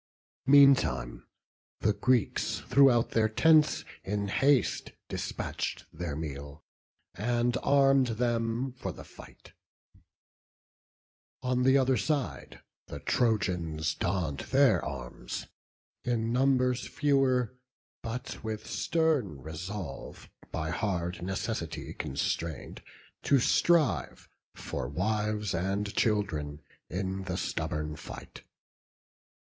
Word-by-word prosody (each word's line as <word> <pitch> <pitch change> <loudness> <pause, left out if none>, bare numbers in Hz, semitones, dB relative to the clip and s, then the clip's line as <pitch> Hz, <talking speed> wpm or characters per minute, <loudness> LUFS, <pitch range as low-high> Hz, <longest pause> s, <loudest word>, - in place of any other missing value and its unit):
Meantime, 135 - +5 0.5
the 105 - +3
Greeks 125 0 +1
throughout 135 -4 +5
their 110 -1 +2
tents 155 +6 +4 0.2
in 100 0 -2
haste 135 +2 +2 0.2
Despatch'd - - -4
their 85 -5 -4
meal, 70 -1 -6 0.5
and 120 +3 0
arm'd 135 -2 +4
them 120 +1 0
for 130 - -5
the - - -10
fight; - - -15 1.9
On 125 0 +1
th' 130 +1 +5
other 130 -1 +3
side 145 -5 -2 0.3
the - - -7
Trojans 85 -9 0
donn'd 85 -5 -1
their 135 -3 +4
arms, 60 -3 -6 0.6
In 115 -1 0
numbers 125 -1 +2
fewer, 135 -4 +2 0.5
but 115 +1 -6
with 110 -1 -4
stern 155 - 0
resolve, 80 0 -7 0.2
By 80 +2 -2
hard 90 -3 -2
necessity 95 -1 -3
constrain'd, 75 +1 -3 0.4
to 140 - +4
strive, 155 +1 +2 0.3
For 60 - -4
wives 105 - -1
and 100 +4 -1
children, 80 -10 0 0.3
in 95 +1 -3
the 90 0 -3
stubborn 75 0 -3
fight. - - -10
110 Hz, 95 wpm, -30 LUFS, 85-130 Hz, 1.9 s, Meantime